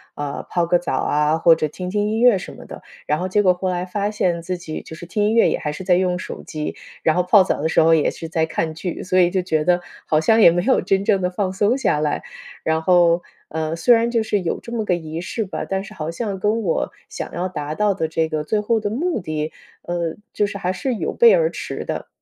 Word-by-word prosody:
啊， 145 -1 -5
泡 175 -1 +1
个 175 +1 +3
澡 170 -6 -2
啊， 150 +3 +1
或 165 0 +6
者 155 - -1
听 180 +4 -6
听 205 +2 0
音 220 +1 -1
乐 240 -4 +6
什 - - -8
么 - - -12
的。 - - -10 0.2
然 150 - +1
后 185 +2 -3
结 205 +3 +3
果 185 -3 +4
后 185 +1 -3
来 180 0 -2
发 205 +2 -2
现 175 -5 0
自 180 +2 -3
己 160 -3 -6
就 160 - -10
是 175 - -9
听 205 +4 -1
音 210 +1 +2
乐 230 - +5
也 - - 0
还 150 - -3
是 165 +5 -7
在 180 -1 +4
用 180 0 +1
手 - - -7
机， 155 -1 -5 0.3
然 160 - +3
后 180 - +2
泡 190 +3 +6
澡 185 - 0
的 160 - 0
时 - - +2
候 165 0 +6
也 155 - +2
是 165 - -7
在 160 -1 0
看 160 0 -2
剧， 170 +2 -5
所 185 0 0
以 180 -1 +5
就 190 - +1
觉 160 -4 0
得 180 +2 +3 0.3
好 155 - +2
像 220 +8 +4
也 170 - +8
没 175 +1 +1
有 260 - +3
真 195 0 0
正 195 -2 +2
的 180 - +1
放 185 +1 -2
松 210 +5 +2
下 150 - +1
来。 150 -1 -1 0.4
然 160 0 +1
后， 175 -1 +4 0.3
呃， 160 0 -2
虽 240 +8 +5
然 230 +1 +1
就 230 - +2
是 210 -2 0
有 170 - -2
这 235 - -11
么 225 -2 -1
个 180 - +2
仪 160 -1 -5
式 220 +4 -3
吧， 190 - -5
但 190 0 -1
是 195 - -11
好 155 0 -5
像 200 +1 -3
跟 215 +4 +1
我 170 -5 -1 0.2
想 - - -6
要 180 +2 -2
达 155 -5 -5
到 210 +1 +2
的 160 -4 -2
这 160 0 0
个 155 -1 -2
最 215 +7 0
后 220 +2 +1
的 210 -1 -2
目 305 - -1
的， 155 -2 -3 0.3
呃， 170 -2 -2 0.2
就 205 - +1
是 200 - -6
还 180 -1 -1
是 255 +6 -2
有 - - -3
背 470 -1 +6
而 - - +3
驰 - - -6
的。 - - -4
180 Hz, 290 characters per minute, -21 LUFS, 160-205 Hz, 0.4 s, 也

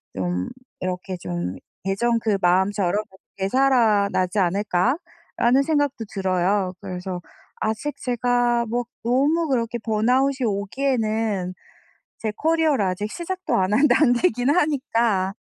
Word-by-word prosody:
좀 90 -1 -2 0.3
이렇게 185 0 -3
좀 90 - -4 0.3
예전 230 +5 +1
그 215 -3 +1
마음처럼 190 +2 +2 0.3
'되살아나지 205 -4 +2
않을까?'라는 210 - 0
생각도 290 -6 0
들어요. 190 0 0
그래서 185 -1 -5 0.4
아직 220 +7 -2
제가 245 -1 +1
뭐 240 +2 -1 0.2
너무 285 +8 +2
그렇게 240 -2 0
번아웃이 250 +5 +1
오기에는 215 -3 -1 0.7
제 220 - -2
커리어를 315 -7 +2
아직 190 +3 -2
시작도 370 +2 -4
안 190 +1 +1
한 275 +8 +5
단계이긴 245 -3 +3
하니까. 230 - +1
220 Hz, 265 characters per minute, -23 LUFS, 190-255 Hz, 0.7 s, 한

